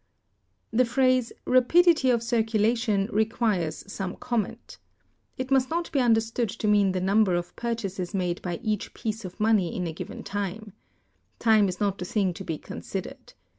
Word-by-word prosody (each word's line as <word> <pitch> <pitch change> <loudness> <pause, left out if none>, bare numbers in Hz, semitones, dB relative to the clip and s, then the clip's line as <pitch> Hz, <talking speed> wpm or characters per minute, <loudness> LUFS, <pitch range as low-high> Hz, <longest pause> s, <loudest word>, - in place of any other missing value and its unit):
The 235 +3 +4
phrase, 255 0 +2
rapidity 305 +3 +4
of 235 -2 +2
circulation, 225 -2 +1
requires 215 -6 0
some 195 -2 -5
comment. 240 -4 -4 0.6
It 255 +1 -4
must 265 -1 +3
not 335 +1 -2
be 280 - +1
understood 230 -1 +2
to 215 +1 -3
mean 205 -2 +4
the 185 - 0
number 195 0 +3
of 175 0 -4
purchases 200 -6 -3
made 180 -3 -2
by 175 -2 -4
each 215 -3 -2
piece 220 -2 -4
of 180 - -9
money 210 -5 +2
in 180 - -2
a 165 - -3
given - - -7
time. 205 +1 -4 0.6
Time 215 -3 +4
is 180 - -5
not 200 -2 0
the 180 - -4
thing 190 -1 0
to - - -8
be 160 - -3
considered. - - -7
215 Hz, 165 wpm, -26 LUFS, 190-235 Hz, 0.6 s, The